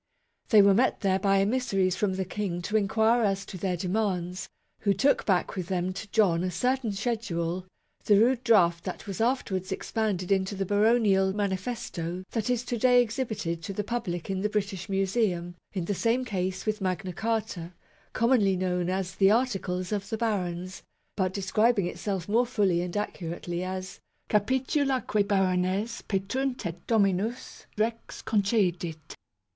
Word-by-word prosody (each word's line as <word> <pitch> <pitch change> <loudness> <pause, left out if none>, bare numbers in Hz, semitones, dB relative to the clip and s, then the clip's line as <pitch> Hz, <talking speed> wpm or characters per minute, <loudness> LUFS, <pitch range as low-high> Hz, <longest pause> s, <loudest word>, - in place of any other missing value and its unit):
They 210 -3 +7
were 200 0 +6
met 245 +6 +2
there 190 -1 +2
by 195 0 +3
emissaries 195 -4 +1
from 195 -3 0
the 190 0 -2
King 185 -2 -3
to 210 - -3
inquire 220 +3 +3
as 195 -2 0
to - - -9
their 185 0 -2
demands; 185 -1 -2 0.3
who 200 -2 +1
took 275 +9 +2
back 185 -3 +1
with 185 -3 -4
them 185 -1 -1
to 200 +2 -7
John 185 -6 +3
a 185 - 0
certain 250 +6 0
schedule 185 -5 -2 0.4
the 205 -1 +5
rude 245 +2 +3
draft 175 -8 +4
that - - -5
was 200 +2 -4
afterwards 205 -6 0
expanded 200 -2 -2
into 195 +1 +1
the 195 0 -2
baronial 205 -2 +3
manifesto 190 -3 -3
that 225 0 -2
is 245 -1 +1
to 240 -2 -3
day 250 +1 +5
exhibited 220 -8 -3
to 190 +4 -5
the 210 - -2
public 190 -7 -3
in 190 -1 -2
the 210 - 0
British 200 -2 -3
Museum 195 -3 0 0.2
in 185 -4 -3
the 205 - -1
same 235 +6 +1
case 190 -4 -2
with 215 -1 -1
Magna 185 -1 -2
Carta, 215 -5 -2 0.4
commonly 225 -5 +3
known 180 -1 -1
as 185 0 -2
the 195 0 +4
"Articles 195 -6 0
of 200 -1 -2
the 220 - -2
Barons," 185 -5 -2 0.3
but 185 -2 0
describing 200 +2 +2
itself 190 0 -3
more 235 +4 +2
fully 195 -7 +2
and 180 +2 -3
accurately 175 -3 -4
as 185 0 -5 0.2
" - - -44
Capitula 260 +4 +1
quae 210 - +1
barones 195 +2 0
petunt 250 +6 -2
et 170 0 -6
dominus 215 +2 0
rex 225 +2 -2
concedit 180 -7 0
195 Hz, 160 wpm, -28 LUFS, 185-220 Hz, 0.4 s, They